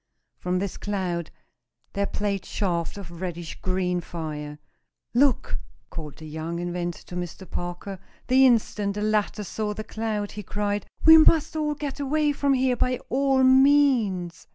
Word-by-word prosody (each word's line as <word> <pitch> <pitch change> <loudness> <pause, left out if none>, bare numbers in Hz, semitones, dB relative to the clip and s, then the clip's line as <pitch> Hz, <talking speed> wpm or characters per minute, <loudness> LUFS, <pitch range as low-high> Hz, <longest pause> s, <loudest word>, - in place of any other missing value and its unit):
From 180 0 -1
this 195 0 -3
cloud 180 -5 -2 0.6
there 200 0 0
played 200 -2 -2
shafts 175 -3 -2
of 170 -3 -9
reddish 175 -3 -5
green 180 -1 0
fire. 150 -3 -6 0.6
"Look!" 260 +1 +2 0.3
called 155 -4 -7
the 160 - -10
young 160 +2 -4
inventor 175 0 -3
to 180 - -9
Mr. 180 +1 -6
Parker. 175 +2 -5 0.3
The 260 +1 +6
instant 210 -4 +1
the 210 - -2
latter 210 0 0
saw 210 +2 -3
the 215 - -5
cloud, 215 -2 -3
he 210 - -6
cried: 205 +1 -2 0.2
"We 320 0 +10
must 315 0 +4 0.2
get 290 -1 -5
away 295 +2 +1
from 280 -1 +1
here 255 -1 +2
by 250 +1 0
all 270 0 +2
means! 260 -10 +4
205 Hz, 150 wpm, -25 LUFS, 175-255 Hz, 0.6 s, We